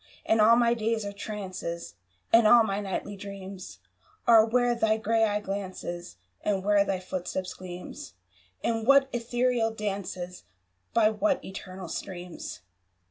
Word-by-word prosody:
And 220 -1 +3
all 225 +2 +7
my 235 0 +4
days 225 -1 -1
are 200 - -4
trances, 190 -5 -5 0.4
And 230 -1 +7
all 235 +1 +8
my 195 -2 -1
nightly 200 0 -4
dreams 195 - -8 0.5
Are 225 -2 +8
where 245 +2 +2
thy 220 -2 +2
grey 225 +1 +2
eye 210 -1 0
glances, 185 - -5 0.3
And 195 -2 0
where 205 0 +4
thy 195 -2 -1
footstep 185 0 -4
gleams 180 - -9 0.5
In 225 -1 0
what 275 +1 +6
ethereal 240 0 +1
dances, 195 -4 -4 0.5
By 220 -2 +5
what 275 +6 0
eternal 190 -1 -8
streams. 175 - -6
205 Hz, 135 wpm, -28 LUFS, 190-230 Hz, 0.5 s, all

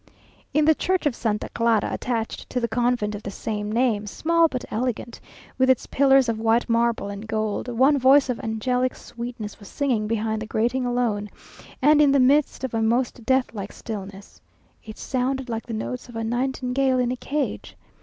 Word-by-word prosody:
In 300 +1 +3
the 315 - +6
church 370 +2 -1
of 285 -5 +1
Santa 210 -3 -2
Clara, 230 -3 +1
attached 230 -2 -3
to 250 - -1
the 235 - 0
convent 235 -2 0
of 205 - -6
the 200 - -6
same 210 +1 -4
name, 225 -3 +1
small 335 - +2
but 255 -5 -5
elegant, 240 +1 -3 0.4
with 260 0 +4
its 260 - +3
pillars 270 -1 +4
of 225 -1 -1
white 225 +1 +2
marble 235 -3 +1
and 200 +2 -7
gold, 215 0 -2
one 265 +4 +3
voice 265 +2 +5
of 250 -2 -2
angelic 250 +3 -1
sweetness 235 -3 -7
was 200 - -12
singing 245 -7 0
behind 220 0 -1
the 220 - -5
grating 240 +4 0
alone, 230 -4 -1 0.5
and 300 +1 +6
in 290 -2 +5
the 280 - +4
midst 275 +2 +3
of 260 - -3
a 225 - 0
most 235 +1 0
deathlike 245 -6 0
stillness. 200 -3 -8 0.4
It 215 0 -10
sounded 260 0 -2
like 225 0 -4
the 230 - -5
notes 250 +3 -5
of 240 - -11
a 225 - -2
nightingale 255 +2 0
in 250 -1 +1
a - - -1
cage. 285 +3 -4
240 Hz, 185 wpm, -24 LUFS, 220-260 Hz, 0.5 s, the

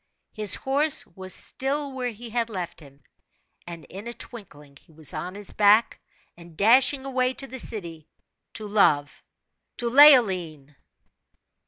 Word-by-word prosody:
His 210 -3 +3
horse 285 +3 +2
was 190 -1 -10
still 280 +6 -3
where 255 -2 -4
he 230 +1 -10
had 235 0 -2
left 180 -5 -7
him, 140 -3 -18 0.6
and 170 -2 -9
in 200 +4 -10
a 235 - -7
twinkling 150 - -12
he - - -24
was 155 -1 -3
on 170 +4 -6
his 205 -1 -8
back, 210 +2 +3 0.4
and 170 -2 -16
dashing 260 +5 +4
away 255 -1 -1
to 275 - -4
the 260 -1 -9
city, 170 -10 -3 0.5
to 215 - -6
love 150 -9 +1 0.6
to 240 - -2
Leoline! 185 - +4
210 Hz, 145 wpm, -24 LUFS, 170-255 Hz, 0.6 s, dashing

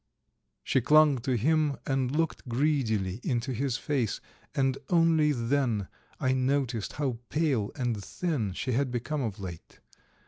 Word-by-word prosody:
She 130 - +2
clung 150 +1 +5
to 130 +2 -1
him 150 +3 +2
and 135 -2 0
looked 155 -2 -1
greedily 115 -8 0
into 125 +1 -1
his 125 0 -1
face, 130 -6 -1 0.4
and 135 -1 +1
only 165 -3 +4
then 120 -5 0 0.3
I 130 - +1
noticed 130 -4 0
how 135 -6 -2
pale 140 -10 +1
and 120 -6 -2
thin 145 - -2
she 130 - -3
had 130 +2 +1
become 125 +5 -2
of 110 -6 -3
late. 90 -4 -9
130 Hz, 140 wpm, -29 LUFS, 115-145 Hz, 0.4 s, clung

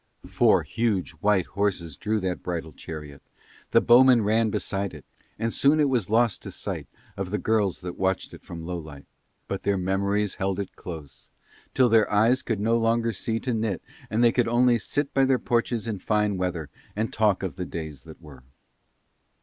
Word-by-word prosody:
Four - - +3
huge 110 -5 -1
white 100 -1 +2
horses 95 -6 -2
drew 110 +1 -1
that 90 -1 -2
bridal 85 -3 -4
chariot, 75 -3 -9 0.5
the - - +5
bowmen 125 -1 +6
ran 110 +2 +2
beside 100 -3 -2
it, 75 - -12 0.3
and 115 +1 -1
soon 145 +3 +4
it 145 -2 +3
was 120 -8 0
lost 115 -1 +2
to - - -8
sight - - -5 0.3
of 95 -2 -4
the 105 - -1
girls 105 -6 0
that 90 -1 -7
watched 95 0 -1
it - - -11
from 85 -2 -8
Lowlight; 80 -5 -7 0.4
but 95 - -3
their 100 -1 +1
memories 100 +2 0
held 95 0 0
it 100 - -5
close 75 -7 -9 0.5
till 130 -2 +5
their 110 -2 +4
eyes 115 +5 +3
could 115 -4 -2
no 115 +3 +2
longer 115 0 +1
see 115 -1 -2
to 125 - -1
knit 110 -5 -2 0.3
and 115 +3 +1
they 120 - +6
could 120 -1 +1
only 120 0 +3
sit 145 +5 -2
by 135 - +4
their 130 -1 +3
porches 120 -2 0
in 110 -4 -3
fine 105 +1 +1
weather 90 -5 -3 0.2
and 110 +2 -2
talk 105 -3 +2
of 95 - -3
the 90 - -4
days 80 -4 -7
that 80 -1 -12
were. 75 -6 -14
105 Hz, 190 wpm, -26 LUFS, 90-115 Hz, 0.5 s, bowmen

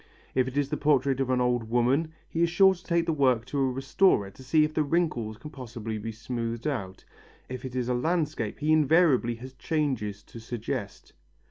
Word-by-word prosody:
If 130 -1 +2
it 130 +2 -5
is 140 -1 +1
the - - -1
portrait 140 -2 +2
of 135 -1 0
an 130 -1 +2
old 120 -2 0
woman, 130 +7 +2 0.2
he 165 - -2
is 170 - +4
sure 190 +3 +5
to 180 0 -14
take 170 -1 +1
the 165 - 0
work 130 -6 +2
to 140 +2 -3
a 135 -1 +2
restorer 135 - +2
to 130 - -14
see 155 +4 +3
if 155 0 -1
the 155 - +1
wrinkles 140 -9 0
can 150 - -10
possibly 115 -5 -6
be 115 +2 -5
smoothed 115 +1 -4
out, 105 -11 -4 0.4
if 130 0 -6
it 130 -1 -6
is 125 -2 -1
a 125 - +1
landscape 150 -4 -1
he 150 +1 0
invariably 155 -6 +4
has 130 +3 -10
changes 130 -9 -2
to 115 - -11
suggest. 115 -1 -5
130 Hz, 210 wpm, -27 LUFS, 120-155 Hz, 0.4 s, sure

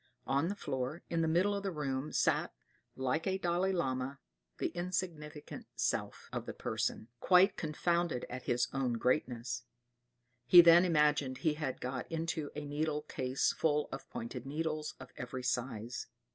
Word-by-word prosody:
On 140 +4 +1
the 200 - -2
floor, 135 -1 -3
in 165 -1 +1
the 160 - +2
middle 180 +6 +3
of 200 - -2
the 195 - -2
room, 145 -4 -2
sat, - - +2 0.4
like 130 +6 -1
a 190 0 +1
Dalai 180 +1 +1
Lama, 135 -6 -1 0.4
the - - 0
insignificant 175 -4 -4
"Self" - - -1
of - - -3
the - - -5
person, 110 - -2
quite 190 +2 +5
confounded 170 -2 0
at 125 +1 -7
his 120 0 +2
own 135 -3 0
greatness. 125 0 0 0.9
He 175 +7 +11
then 170 +1 +8
imagined 150 -5 +2
he 155 - +4
had 150 -4 -3
got 130 +3 -4
into 165 -2 -2
a 150 0 -4
needle 150 +1 -1
case 130 -3 0
full 150 -2 +1
of 135 - -7
pointed 120 +1 -5
needles 155 +2 -3
of - - -11
every 125 0 -5
size. 120 -2 -2
150 Hz, 160 wpm, -33 LUFS, 130-170 Hz, 0.9 s, He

